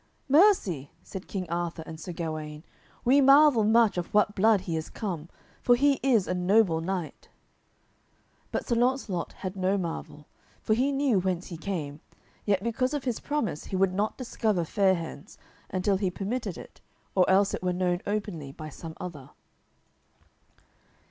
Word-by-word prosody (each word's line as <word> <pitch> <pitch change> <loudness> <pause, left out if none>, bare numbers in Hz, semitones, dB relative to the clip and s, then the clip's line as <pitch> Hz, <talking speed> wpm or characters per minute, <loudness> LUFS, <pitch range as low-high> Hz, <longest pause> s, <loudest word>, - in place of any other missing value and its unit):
"Mercy," 270 - +4
said 190 -1 -8
King 185 -3 -4
Arthur 170 -1 -2
and 160 0 -9
Sir 180 - -6
Gawaine, 155 -2 -5 0.4
"we 270 +4 +5
marvel 275 -3 +6
much 220 -3 +4
of 175 - -5
what 210 0 +4
blood 215 0 +4
he 175 -4 -3
is 160 0 -4
come, 170 -7 -5 0.3
for 245 - +5
he 280 +2 +3
is 235 -8 +3
a - - 0
noble 180 -2 +3
knight." 180 -2 -4 1.2
But - - -2
Sir 240 - +1
Launcelot 235 -7 0
had 185 0 -6
no 190 +1 +1
marvel, 165 -4 -5 0.3
for 215 - +1
he 260 +5 +2
knew 275 -7 +2
whence 185 -1 -1
he 175 - -6
came, 160 -5 -4 0.5
yet 200 -2 +1
because 255 +4 0
of 285 - -3
his 245 -4 -2
promise 285 - -2
he - - -5
would 190 0 +2
not 205 +3 -1
discover 215 -8 -1
Fair 190 +2 +3
hands 165 -4 -8 0.3
until 190 +1 +1
he 190 -1 0
permitted 200 +1 -4
it - - -12 0.3
or 185 -2 +3
else 195 +1 +4
it - - -3
were 180 0 0
known 180 0 0
openly 200 -9 -3
by 155 +2 -8
some 160 +2 -9
other. 160 -7 -7
190 Hz, 165 wpm, -27 LUFS, 170-225 Hz, 1.2 s, marvel